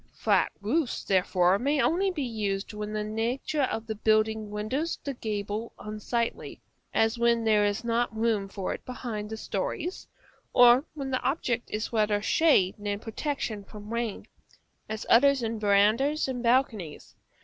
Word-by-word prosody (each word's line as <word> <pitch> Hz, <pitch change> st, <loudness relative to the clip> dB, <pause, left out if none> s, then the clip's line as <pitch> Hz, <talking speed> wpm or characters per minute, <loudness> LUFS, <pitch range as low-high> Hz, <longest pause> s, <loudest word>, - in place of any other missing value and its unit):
Flat -, -, +2 dB
roofs, 250 Hz, +6 st, -1 dB
therefore, 185 Hz, 0 st, +2 dB
may 285 Hz, +3 st, +1 dB
only 370 Hz, +7 st, +2 dB
be 330 Hz, -6 st, -3 dB
used 210 Hz, -5 st, -3 dB
when 210 Hz, 0 st, -5 dB
the 215 Hz, 0 st, -2 dB
nature 230 Hz, +7 st, -2 dB
of 230 Hz, -4 st, -1 dB
the 220 Hz, -, -3 dB
building 215 Hz, 0 st, +1 dB
renders 215 Hz, +11 st, -2 dB
the 280 Hz, -, -3 dB
gable 215 Hz, -1 st, -4 dB
unsightly; 215 Hz, +2 st, -3 dB, 0.3 s
as 225 Hz, +2 st, +1 dB
when 235 Hz, -1 st, +3 dB
there 215 Hz, -2 st, +4 dB
is 205 Hz, +3 st, 0 dB
not 235 Hz, -1 st, 0 dB
room 220 Hz, -3 st, +1 dB
for 195 Hz, -1 st, -3 dB
it -, -, -8 dB
between 235 Hz, -4 st, -5 dB
the 220 Hz, +1 st, -6 dB
stories; 350 Hz, -, -4 dB, 0.5 s
or 245 Hz, +3 st, +7 dB
when 275 Hz, -3 st, -4 dB
the 255 Hz, -, 0 dB
object 255 Hz, -4 st, -1 dB
is 215 Hz, +2 st, -4 dB
rather 210 Hz, -2 st, +2 dB
shade 205 Hz, -, +3 dB
than 205 Hz, 0 st, -2 dB
protection 225 Hz, -1 st, -4 dB
from 210 Hz, +2 st, -10 dB
rain, 235 Hz, -3 st, -3 dB, 0.6 s
as 220 Hz, 0 st, -4 dB
often 280 Hz, +4 st, +6 dB
in 225 Hz, 0 st, -3 dB
verandahs 215 Hz, +9 st, +3 dB
and 255 Hz, -2 st, -3 dB
balconies. 230 Hz, -, 0 dB
225 Hz, 155 wpm, -28 LUFS, 210-255 Hz, 0.6 s, or